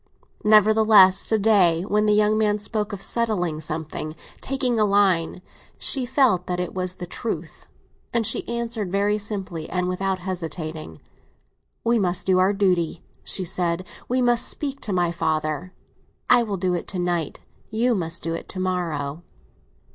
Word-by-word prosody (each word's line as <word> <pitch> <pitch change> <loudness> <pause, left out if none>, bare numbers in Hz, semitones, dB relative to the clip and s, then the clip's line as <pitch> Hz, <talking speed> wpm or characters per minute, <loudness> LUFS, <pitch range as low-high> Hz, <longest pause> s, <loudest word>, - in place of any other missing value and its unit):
Nevertheless, 215 -2 +5
to 220 - +3
day, 190 -6 +3
when 210 +2 +1
the 210 - +4
young 210 0 +3
man 210 -1 +2
spoke 210 0 -3
of 200 -1 -5
settling 180 -9 0
something, 155 0 -4 0.3
taking 255 -3 0
a - - +4
line, 195 -4 +2 0.3
she 260 -3 0
felt 245 -9 +2
that 180 0 -2
it 180 - -3
was 185 -1 -1
the 180 - -7
truth, 225 +6 -6 0.4
and 235 -1 0
she 220 - +1
answered 235 -5 -3
very 205 +2 +1
simply 190 -6 -5
and 180 -1 -1
without 190 +1 -1
hesitating. 165 - -6 0.8
"We 235 0 +2
must 180 -2 0
do 185 -1 +3
our 185 +2 +4
duty," 180 -5 0 0.2
she 190 - -2
said; 175 0 -1 0.2
"we 255 +1 +1
must 240 -1 +3
speak 280 -2 -2
to 210 - -3
my 175 -2 +1
father. 160 +1 -2 0.6
I 245 - +7
will 210 -4 -2
do 180 0 0
it 175 - -3
to 190 - -5
night; 175 -3 -2 0.3
you 235 +3 +1
must 170 -4 -3
do 165 +1 -2
it 165 - -6
to 185 - -6
morrow." 170 -5 -2
190 Hz, 160 wpm, -23 LUFS, 175-215 Hz, 0.8 s, I